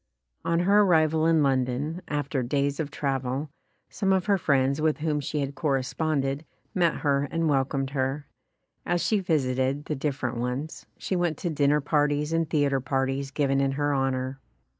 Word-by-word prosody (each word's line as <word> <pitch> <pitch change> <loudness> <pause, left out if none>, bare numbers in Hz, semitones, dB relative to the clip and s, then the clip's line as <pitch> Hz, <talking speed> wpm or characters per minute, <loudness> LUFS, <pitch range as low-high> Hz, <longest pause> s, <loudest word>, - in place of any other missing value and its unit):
On 170 +1 +1
her 200 +3 +5
arrival 160 -4 +3
in 160 -2 +4
London, 135 +5 0
after 145 -2 -1
days 140 +3 -1
of 155 -3 -2
travel, 135 0 -2 0.4
some 195 -1 -1
of 190 -1 +2
her 200 -2 +2
friends 140 -1 +2
with 155 -1 +2
whom 150 -1 -1
she 145 +1 -2
had 140 0 -3
corresponded, 140 +1 -1 0.3
met 170 -3 +1
her 140 -1 +1
and 165 0 0
welcomed 135 -1 0
her. 135 +1 -1 0.6
As 175 0 0
she 215 - +2
visited 140 -5 0
the 155 - -2
different 135 -3 -2
ones, 125 +6 -4
she 190 - -2
went 175 -4 0
to 175 - -2
dinner 145 0 +2
parties 145 +1 +1
and 165 -1 0
theatre 140 -4 +1
par 135 +1 0
ties 135 +1 -3
given 135 -1 +1
in 135 0 +1
her 145 +1 0
honor. 135 -1 -1
145 Hz, 170 wpm, -26 LUFS, 135-160 Hz, 0.6 s, her